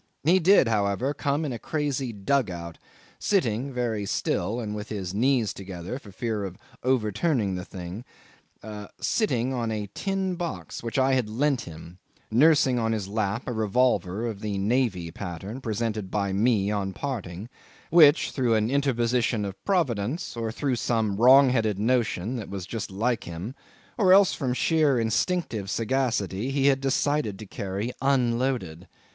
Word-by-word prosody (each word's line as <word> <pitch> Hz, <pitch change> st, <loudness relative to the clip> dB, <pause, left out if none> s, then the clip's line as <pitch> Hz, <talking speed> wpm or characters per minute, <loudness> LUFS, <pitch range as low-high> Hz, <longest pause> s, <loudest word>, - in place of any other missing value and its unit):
He 175 Hz, +6 st, +5 dB
did, 185 Hz, -, +5 dB
however, 105 Hz, +5 st, 0 dB
come 145 Hz, +2 st, -1 dB
in 135 Hz, -, -3 dB
a 115 Hz, -, -5 dB
crazy 145 Hz, -5 st, -2 dB
dug 110 Hz, +3 st, 0 dB
out, 85 Hz, -2 st, -7 dB, 0.4 s
sitting 135 Hz, -, 0 dB
(very 115 Hz, -5 st, -2 dB
still 115 Hz, +4 st, -1 dB
and 105 Hz, -3 st, -4 dB
with 105 Hz, 0 st, -6 dB
his 95 Hz, -4 st, -4 dB
knees 120 Hz, 0 st, +2 dB
together, 95 Hz, +4 st, -6 dB
for 105 Hz, -, -13 dB
fear 110 Hz, +1 st, -3 dB
of 95 Hz, -2 st, -6 dB, 0.2 s
overturning 120 Hz, -, +1 dB
the 90 Hz, 0 st, -4 dB
thing) 90 Hz, +3 st, -8 dB, 1.0 s
sitting 130 Hz, -, 0 dB
on 120 Hz, -3 st, -1 dB
a 105 Hz, -2 st, -4 dB
tin 195 Hz, -1 st, -1 dB
box 170 Hz, -, -5 dB
which 115 Hz, +3 st, -4 dB
I 135 Hz, 0 st, +3 dB
had 125 Hz, -5 st, +1 dB
lent 135 Hz, +3 st, +1 dB
him 85 Hz, +2 st, -11 dB, 0.3 s
nursing 135 Hz, 0 st, +4 dB
on 115 Hz, -1 st, 0 dB
his 105 Hz, -4 st, -3 dB
lap 105 Hz, +2 st, -1 dB
a -, -, -3 dB
revolver 110 Hz, -2 st, +1 dB
of 110 Hz, -4 st, -4 dB
the 105 Hz, -2 st, -2 dB
Navy 100 Hz, -5 st, 0 dB
pattern 100 Hz, +7 st, -6 dB
presented 110 Hz, -3 st, -2 dB
by 100 Hz, -1 st, -1 dB
me 105 Hz, -1 st, +2 dB
on 100 Hz, -2 st, -2 dB
parting 105 Hz, -6 st, -5 dB, 0.4 s
which, 155 Hz, -2 st, +6 dB
through 125 Hz, -4 st, +1 dB
an 110 Hz, +2 st, +1 dB
interposition 120 Hz, -5 st, +1 dB
of 100 Hz, -1 st, -7 dB
Providence, 145 Hz, -, 0 dB
or 115 Hz, -1 st, -2 dB
through 130 Hz, +1 st, -1 dB
some 110 Hz, -4 st, 0 dB
wrong 130 Hz, +3 st, +7 dB
headed 110 Hz, -5 st, +1 dB
notion, 115 Hz, 0 st, 0 dB
that 110 Hz, -, -6 dB
was 95 Hz, -2 st, -5 dB
just 105 Hz, +2 st, -5 dB
like 110 Hz, +4 st, -1 dB
him, 85 Hz, +8 st, -6 dB, 0.5 s
or 185 Hz, -4 st, +6 dB
else 195 Hz, -1 st, +6 dB
from 130 Hz, -4 st, -2 dB
sheer 150 Hz, -4 st, +2 dB
instinctive 115 Hz, -, -1 dB
sagacity, 115 Hz, -2 st, -1 dB
he 135 Hz, 0 st, 0 dB
had 135 Hz, -1 st, +4 dB
decided 135 Hz, -5 st, 0 dB
to 110 Hz, -, -9 dB
carry 100 Hz, +4 st, -4 dB
unloaded. 120 Hz, -9 st, 0 dB
115 Hz, 160 wpm, -26 LUFS, 100-135 Hz, 1.0 s, wrong